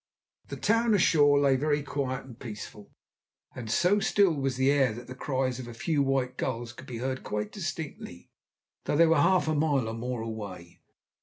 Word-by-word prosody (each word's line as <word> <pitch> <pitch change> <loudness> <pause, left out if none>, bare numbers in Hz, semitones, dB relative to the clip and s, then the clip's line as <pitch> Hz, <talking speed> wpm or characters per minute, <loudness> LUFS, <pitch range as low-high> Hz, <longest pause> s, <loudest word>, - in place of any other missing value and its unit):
The - - -6
town 225 +1 +2
ashore 150 -6 +4
lay 140 -2 +4
very 145 +2 0
quiet 135 -2 -3
and 125 -2 -13
peaceful, 105 -2 -9 0.6
and 115 -3 -7
so 180 - +3
still 195 -2 +3
was 135 -3 -1
the 130 +1 +3
air 135 -5 +3
that 120 +2 -9
the 130 - -8
cries 130 -1 -2
of 125 - -7
a 120 - -9
few 150 +4 0
white 135 -2 0
gulls 120 -2 -3
could 130 +1 -12
be 120 - -6
heard 130 +2 -3
quite 105 0 -3
distinctly, 160 - -6 0.5
though - - 0
they 165 - +7
were 160 -3 +4
half 185 -2 +3
a 155 - +1
mile 145 -5 +1
or 110 - -4
more 120 +1 -4
away. 100 -6 -8
130 Hz, 190 wpm, -28 LUFS, 120-150 Hz, 0.6 s, they